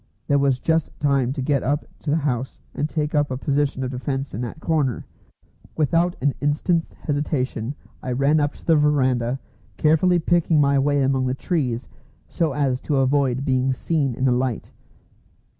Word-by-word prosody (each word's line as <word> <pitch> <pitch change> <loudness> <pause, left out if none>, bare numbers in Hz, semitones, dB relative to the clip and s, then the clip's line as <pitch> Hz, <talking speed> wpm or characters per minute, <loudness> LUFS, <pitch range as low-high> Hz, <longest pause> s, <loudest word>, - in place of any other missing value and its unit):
There 140 0 +2
was 140 -2 +2
just 160 +2 +1
time 140 -3 +2
to 135 -2 -3
get 140 -1 +1
up 145 +3 -1
to 155 - -5
the 145 - +3
house 135 -5 -2 0.2
and 150 - -2
take 150 -1 -2
up 145 -1 +2
a 130 - -3
position 140 -1 0
of 130 - -3
defence 135 +1 -3
in 110 - -4
that 125 +5 -5
corner. 150 -7 0 0.7
Without 165 +3 +2
an 140 0 +2
instant's 160 +4 0
hesitation 140 -4 -2 0.3
I 130 - -3
ran 140 +4 +3
up 145 -1 0
to - - -17
the 165 - +4
verandah, 130 -4 +2 0.4
carefully 160 +4 +3
picking 170 -1 +2
my 140 -1 +4
way 145 0 +2
among 130 -1 +1
the 125 - -1
trees, 130 -7 -2 0.4
so 165 -5 -1
as 135 -3 0
to 150 - -2
avoid 135 -1 +1
being 130 -1 +1
seen 140 -2 -1
in 130 - -1
the 130 - +4
light. 125 -1 -1
140 Hz, 175 wpm, -23 LUFS, 130-150 Hz, 0.7 s, the